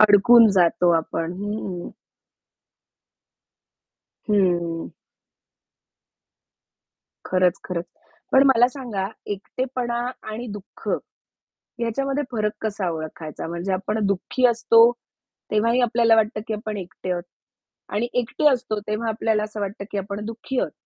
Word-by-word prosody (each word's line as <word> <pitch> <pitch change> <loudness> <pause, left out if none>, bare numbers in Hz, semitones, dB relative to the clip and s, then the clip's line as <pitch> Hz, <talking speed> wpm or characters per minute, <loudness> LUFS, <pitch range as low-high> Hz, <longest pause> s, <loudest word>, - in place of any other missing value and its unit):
अडकून 215 +2 +7
जातो 180 -2 +3
आपण. 165 +1 -3
हं. 205 -4 -4 2.4
हं. 175 -4 +1 2.4
खरंच, 185 -1 +2
खरंच. 175 -2 -3 0.5
पण 265 - +7
मला 245 -2 +6
सांगा 240 -8 -4 0.2
एकटेपणा 240 +3 -3 0.3
आणि 230 +3 -5
दुःख 205 -1 -10 0.9
याच्यामध्ये 275 +5 -1
फरक 215 -3 0
कसा 200 -4 -2
ओळखायचा? 155 -1 -6
म्हणजे 170 +3 -3
आपण 200 +4 -1
दुःखी 200 +6 +1
असतो 230 0 +5 0.6
तेव्हाही 230 +4 +3
आपल्याला 230 -1 +4
वाटतं, 215 0 +1
की 220 - -2
आपण 215 0 -4
एकटे 185 0 -6
आहोत 175 -1 -2 0.7
आणि 215 +4 0
एकटे 250 +5 +1
असतो 245 -5 -1
तेव्हा 215 +2 -1
आपल्याला 220 -1 0
असं 215 0 -6
वाटतं, 200 0 -4
की 205 - -3
आपण 200 +2 -4
दुःखी 230 +4 -3
आहोत. - - -1
210 Hz, 110 wpm, -23 LUFS, 190-235 Hz, 2.4 s, अडकून